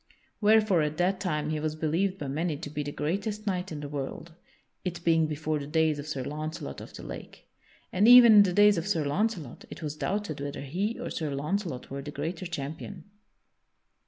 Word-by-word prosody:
Wherefore 215 Hz, -4 st, +4 dB
at 150 Hz, 0 st, -1 dB
that 185 Hz, +2 st, +1 dB
time 155 Hz, -5 st, -1 dB
he 155 Hz, -, -1 dB
was 155 Hz, 0 st, -2 dB
believed 170 Hz, +5 st, 0 dB
by 145 Hz, -, -5 dB
many 155 Hz, +3 st, -1 dB
to 145 Hz, -1 st, -7 dB
be 150 Hz, 0 st, -3 dB
the 145 Hz, 0 st, -4 dB
greatest 200 Hz, +9 st, -3 dB
knight 185 Hz, -2 st, -2 dB
in 150 Hz, -2 st, -5 dB
the 145 Hz, -, -5 dB
world 145 Hz, +3 st, -6 dB, 0.5 s
(it 175 Hz, -2 st, -4 dB
being 165 Hz, -2 st, +3 dB
before 155 Hz, 0 st, -2 dB
the 140 Hz, -, -6 dB
days 155 Hz, -1 st, +2 dB
of 145 Hz, -, -7 dB
Sir 140 Hz, -4 st, -3 dB
Launcelot 150 Hz, -, -5 dB
of -, -, -10 dB
the -, -, -9 dB
Lake), -, -, -9 dB, 0.5 s
and 200 Hz, +4 st, +4 dB
even 245 Hz, -2 st, +10 dB
in -, -, +11 dB
the 195 Hz, -3 st, +3 dB
days 205 Hz, 0 st, +5 dB
of 165 Hz, -, -5 dB
Sir 165 Hz, -7 st, 0 dB
Launcelot 170 Hz, -, -2 dB
it -, -, -9 dB
was 150 Hz, -1 st, -3 dB
doubted 195 Hz, -4 st, -3 dB
whether 140 Hz, 0 st, -4 dB
he 185 Hz, -, -2 dB
or -, -, -5 dB
Sir 155 Hz, -2 st, -2 dB
Launcelot 150 Hz, -2 st, -3 dB
were 140 Hz, 0 st, -4 dB
the 145 Hz, -, -7 dB
greater 160 Hz, +5 st, -4 dB
champion. 160 Hz, +3 st, -6 dB
160 Hz, 205 wpm, -28 LUFS, 150-190 Hz, 0.5 s, in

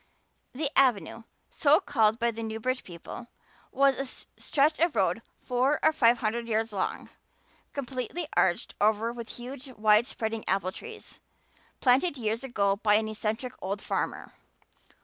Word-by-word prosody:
The 285 Hz, +2 st, -2 dB
"Avenue," 230 Hz, -3 st, +2 dB, 0.3 s
so 300 Hz, +1 st, +4 dB
called 225 Hz, -, +2 dB
by 235 Hz, 0 st, +1 dB
the 230 Hz, 0 st, -6 dB
Newbridge 225 Hz, +3 st, -2 dB
people, 180 Hz, +7 st, -9 dB, 0.4 s
was 275 Hz, -1 st, +3 dB, 0.4 s
a -, -, -21 dB
stretch 300 Hz, +2 st, +2 dB
of 335 Hz, -4 st, +2 dB
road 190 Hz, 0 st, +1 dB, 0.2 s
four 255 Hz, +4 st, +1 dB
or 315 Hz, -, +5 dB
five 240 Hz, -5 st, +4 dB
hundred 230 Hz, +2 st, -1 dB
yards 220 Hz, 0 st, 0 dB
long, 190 Hz, -, -3 dB, 0.6 s
completely 275 Hz, +4 st, -4 dB
arched 175 Hz, -2 st, +1 dB
over 220 Hz, +2 st, +2 dB
with 235 Hz, -2 st, -8 dB
huge, 255 Hz, +2 st, -8 dB
wide 215 Hz, +1 st, +4 dB
spreading 220 Hz, -3 st, -3 dB
apple 185 Hz, -1 st, 0 dB
trees, 445 Hz, -, -10 dB, 0.6 s
planted 275 Hz, +5 st, +3 dB
years 225 Hz, +1 st, -2 dB
ago 200 Hz, -6 st, +1 dB
by 210 Hz, 0 st, +3 dB
an 215 Hz, 0 st, +1 dB
eccentric 220 Hz, +4 st, -3 dB
old 200 Hz, +2 st, -3 dB
farmer. -, -, -3 dB
235 Hz, 145 wpm, -28 LUFS, 215-270 Hz, 0.6 s, or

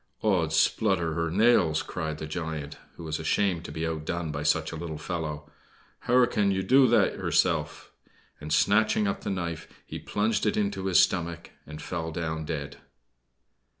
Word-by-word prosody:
"Ods -, -, +1 dB
splutter 80 Hz, -1 st, +2 dB
hur 85 Hz, 0 st, -1 dB
nails!" 90 Hz, -5 st, +3 dB
cried 80 Hz, -1 st, -4 dB
the 80 Hz, -, -6 dB
giant, 80 Hz, -2 st, -5 dB, 0.2 s
who -, -, -10 dB
was 80 Hz, 0 st, -3 dB
ashamed 85 Hz, +2 st, 0 dB
to -, -, -8 dB
be 80 Hz, +1 st, -3 dB
outdone 80 Hz, 0 st, -3 dB
by 75 Hz, 0 st, -4 dB
such 75 Hz, 0 st, +1 dB
a -, -, -6 dB
little 80 Hz, -1 st, -5 dB
fellow. 75 Hz, -2 st, -5 dB, 0.5 s
"Hur 125 Hz, +1 st, +4 dB
can 105 Hz, -4 st, +1 dB, 0.2 s
do 130 Hz, +4 st, +6 dB
that 120 Hz, -, +3 dB
hurself!" -, -, 0 dB, 0.5 s
and, 75 Hz, +1 st, -8 dB
snatching 105 Hz, +5 st, +3 dB
up 100 Hz, -, -2 dB
the -, -, -4 dB
knife, 85 Hz, -4 st, -4 dB, 0.2 s
he -, -, -7 dB
plunged 105 Hz, +1 st, 0 dB
it 105 Hz, -, 0 dB
into 100 Hz, -2 st, -1 dB
his 90 Hz, -4 st, +5 dB
stomach 85 Hz, -2 st, 0 dB, 0.2 s
and 75 Hz, 0 st, -9 dB
fell 80 Hz, 0 st, -4 dB
down 80 Hz, -1 st, -3 dB
dead. 70 Hz, -3 st, -5 dB
85 Hz, 165 wpm, -27 LUFS, 80-100 Hz, 0.5 s, do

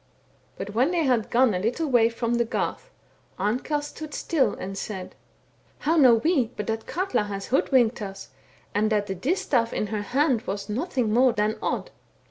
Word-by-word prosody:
But 205 Hz, -, -6 dB
when 250 Hz, +7 st, +3 dB
they 345 Hz, -2 st, +1 dB
had 245 Hz, -6 st, +1 dB
gone 245 Hz, -2 st, +4 dB
a 180 Hz, -, -1 dB
httle 240 Hz, -, -1 dB
way 240 Hz, -4 st, +4 dB
from 235 Hz, 0 st, -2 dB
the 235 Hz, 0 st, +2 dB
garth, 235 Hz, -, -3 dB, 0.5 s
Amkell 250 Hz, +9 st, -1 dB
stood 300 Hz, +1 st, -8 dB
still 265 Hz, -10 st, +1 dB
and 195 Hz, +1 st, -6 dB
said: 190 Hz, -2 st, -6 dB, 0.3 s
* -, -, -36 dB
How 320 Hz, +3 st, +3 dB
know 260 Hz, -7 st, +7 dB
we 265 Hz, +1 st, +2 dB
but 210 Hz, -, -3 dB
that 225 Hz, +1 st, -3 dB
Katla 370 Hz, -, 0 dB
has 200 Hz, -1 st, -6 dB
hoodwinked 245 Hz, -3 st, +2 dB
us, 195 Hz, -1 st, -7 dB, 0.4 s
and 215 Hz, +2 st, +1 dB
that 210 Hz, -1 st, +2 dB
the 195 Hz, -, -3 dB
distaif 240 Hz, -, 0 dB
in -, -, -1 dB
her 210 Hz, -, -1 dB
hand 260 Hz, +2 st, +1 dB
was 200 Hz, +1 st, -4 dB
nothing 250 Hz, -2 st, -1 dB
more 250 Hz, +1 st, +5 dB
than 210 Hz, +1 st, 0 dB
Odd.' -, -, -2 dB
230 Hz, 185 wpm, -25 LUFS, 210-270 Hz, 0.5 s, know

